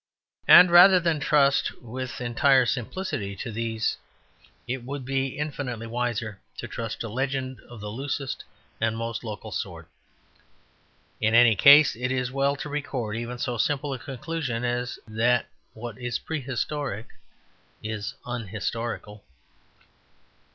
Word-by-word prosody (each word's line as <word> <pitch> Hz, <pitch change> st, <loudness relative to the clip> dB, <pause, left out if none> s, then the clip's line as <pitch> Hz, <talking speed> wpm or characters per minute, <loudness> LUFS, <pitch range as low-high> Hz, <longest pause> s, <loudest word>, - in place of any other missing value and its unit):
And 180 Hz, -1 st, +9 dB
rather 180 Hz, +2 st, +9 dB
than 165 Hz, -3 st, 0 dB
trust 140 Hz, -1 st, +2 dB
with 125 Hz, +2 st, -6 dB
entire 130 Hz, +2 st, +4 dB
simplicity 125 Hz, -, -3 dB
to 115 Hz, +4 st, -6 dB
these 110 Hz, 0 st, -1 dB, 0.7 s
it 125 Hz, 0 st, -3 dB
would 135 Hz, +1 st, -6 dB
be 135 Hz, 0 st, -1 dB
infinitely 140 Hz, -6 st, -4 dB
wiser 115 Hz, -3 st, -3 dB, 0.2 s
to -, -, -5 dB
trust 115 Hz, -1 st, -5 dB
to 115 Hz, -, -3 dB
legend 130 Hz, +2 st, -2 dB
of 120 Hz, -3 st, -10 dB
the 105 Hz, 0 st, -5 dB
loosest 135 Hz, +3 st, -4 dB, 0.4 s
and 115 Hz, 0 st, +1 dB
most 115 Hz, 0 st, -4 dB
local 105 Hz, -2 st, -7 dB
sort. -, -, -5 dB, 1.3 s
In 110 Hz, +1 st, +2 dB
any 120 Hz, -2 st, +7 dB
case, 145 Hz, +7 st, +8 dB
it 125 Hz, +2 st, -2 dB
is 125 Hz, -1 st, 0 dB
as -, -, -12 dB
well 140 Hz, +1 st, +1 dB
to 145 Hz, -, -6 dB
record 135 Hz, -7 st, -3 dB
even 120 Hz, +2 st, -4 dB
so 120 Hz, -1 st, -3 dB
simple 145 Hz, +5 st, 0 dB
a 130 Hz, -, -5 dB
conclusion 130 Hz, -2 st, -4 dB
as 120 Hz, 0 st, -2 dB
that 115 Hz, +3 st, +2 dB, 0.3 s
what 115 Hz, +1 st, -7 dB
is 125 Hz, -1 st, -2 dB
prehistoric 140 Hz, -5 st, -3 dB, 0.8 s
is 110 Hz, -1 st, -4 dB
unhistorical. 115 Hz, -2 st, -4 dB
125 Hz, 135 wpm, -26 LUFS, 115-140 Hz, 1.3 s, And